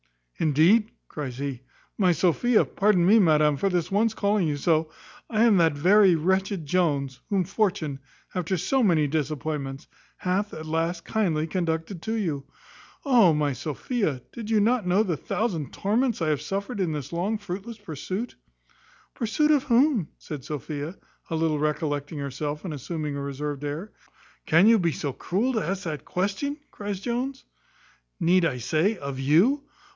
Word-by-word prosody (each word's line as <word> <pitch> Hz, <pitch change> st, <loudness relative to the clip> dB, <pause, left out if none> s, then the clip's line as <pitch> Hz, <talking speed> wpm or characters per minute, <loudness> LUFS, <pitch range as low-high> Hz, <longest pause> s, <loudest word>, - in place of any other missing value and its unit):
"Indeed," 165 Hz, +9 st, +4 dB, 0.2 s
cries 135 Hz, -5 st, -6 dB
he, 135 Hz, -3 st, -4 dB, 0.4 s
"my 185 Hz, -3 st, +4 dB
Sophia, 210 Hz, +8 st, +3 dB
pardon 195 Hz, -4 st, +2 dB
me, 215 Hz, +5 st, +6 dB
madam, 150 Hz, -5 st, +4 dB
for 195 Hz, -, +1 dB
this 175 Hz, -2 st, -1 dB
once 220 Hz, +3 st, +2 dB
calling 200 Hz, -3 st, +1 dB
you 145 Hz, -1 st, -1 dB
so, 160 Hz, +1 st, +1 dB, 0.4 s
I 220 Hz, -1 st, +2 dB
am 225 Hz, -4 st, +5 dB
that 165 Hz, -3 st, +4 dB
very 185 Hz, +5 st, +5 dB
wretched 190 Hz, +1 st, 0 dB
Jones, 140 Hz, -5 st, 0 dB
whom 195 Hz, -3 st, +2 dB
fortune, 180 Hz, -7 st, -1 dB, 0.3 s
after 180 Hz, 0 st, -1 dB
so 260 Hz, +10 st, +1 dB
many 170 Hz, -9 st, +3 dB
disappointments, 145 Hz, -2 st, -3 dB, 0.3 s
hath, 195 Hz, +3 st, -1 dB
at 155 Hz, -, -7 dB
last, 165 Hz, +2 st, -1 dB
kindly 170 Hz, -8 st, 0 dB
conducted 165 Hz, +1 st, -2 dB
to 220 Hz, +5 st, -2 dB
you. 160 Hz, -11 st, -2 dB, 0.6 s
Oh! 235 Hz, -, +6 dB
my 145 Hz, -2 st, +1 dB
Sophia, 150 Hz, -, -2 dB
did 225 Hz, -2 st, -7 dB
you 220 Hz, -1 st, +3 dB
know 210 Hz, -3 st, +2 dB
the 180 Hz, -6 st, -1 dB
thousand 170 Hz, -, -2 dB
torments 230 Hz, +4 st, 0 dB
I 155 Hz, -, +1 dB
have 150 Hz, -2 st, 0 dB
suffered 200 Hz, +3 st, -4 dB
in 180 Hz, -4 st, 0 dB
this 145 Hz, 0 st, -5 dB
long, 195 Hz, +6 st, 0 dB
fruitless 205 Hz, +3 st, -6 dB
pursuit." 195 Hz, -, -5 dB, 0.8 s
"Pursuit 300 Hz, +5 st, +1 dB
of 290 Hz, -3 st, +3 dB
whom?" 245 Hz, -, +3 dB
said 145 Hz, -4 st, -7 dB
Sophia, 150 Hz, +3 st, -5 dB, 0.3 s
a 165 Hz, -, -2 dB
little 160 Hz, -2 st, +1 dB
recollecting 150 Hz, 0 st, -2 dB
herself, 145 Hz, +3 st, -4 dB
and 170 Hz, -, -4 dB
assuming 150 Hz, +1 st, -4 dB
a 140 Hz, -, -4 dB
reserved 140 Hz, +1 st, -4 dB
air. 150 Hz, +8 st, -4 dB, 0.6 s
"Can 165 Hz, +5 st, +5 dB
you 225 Hz, 0 st, +6 dB
be 170 Hz, -3 st, +1 dB
so 140 Hz, -3 st, -3 dB
cruel 220 Hz, -, -1 dB
to 220 Hz, -, 0 dB
ask 195 Hz, +1 st, -3 dB
that 155 Hz, -6 st, -5 dB
question?" 205 Hz, +11 st, -2 dB
cries 205 Hz, -2 st, -5 dB
Jones; 250 Hz, +5 st, -3 dB, 0.7 s
"Need 175 Hz, +1 st, +4 dB
I 135 Hz, -6 st, 0 dB
say, 160 Hz, -, +1 dB
of 140 Hz, -1 st, -5 dB
you?" 185 Hz, -, +3 dB
175 Hz, 160 wpm, -26 LUFS, 150-210 Hz, 0.8 s, me